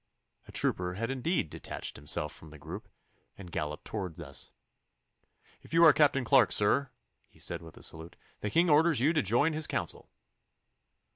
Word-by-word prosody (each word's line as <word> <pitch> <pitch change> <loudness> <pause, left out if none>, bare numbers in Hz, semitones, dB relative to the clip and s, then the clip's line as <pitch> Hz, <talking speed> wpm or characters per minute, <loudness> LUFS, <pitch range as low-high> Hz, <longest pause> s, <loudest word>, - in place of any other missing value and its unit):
A - - -11
trooper 90 0 -1
had 115 +5 -2
indeed 135 - -1
detached - - -5
himself 75 +1 0
from 80 - -12
the 75 - -12
group 75 - -8 0.5
and 90 -3 -10
galloped 75 -1 -4
towards 90 -6 -5
us. 70 -5 -7 1.1
'If - - -7
you 165 - +6
are 160 -3 +9
Captain 140 -3 +3
Clarke, 130 0 +5
sir,' 125 +6 +2 0.4
he - - -25
said, - - -3
with 80 -1 -13
a - - -12
salute, 80 +1 -7 0.2
'the 105 - -3
King 170 - +3
orders 155 -1 +4
you 145 +7 +3
to 155 - +2
join 120 - +2
his 155 0 +1
council. - - -3
115 Hz, 170 wpm, -30 LUFS, -, 1.1 s, are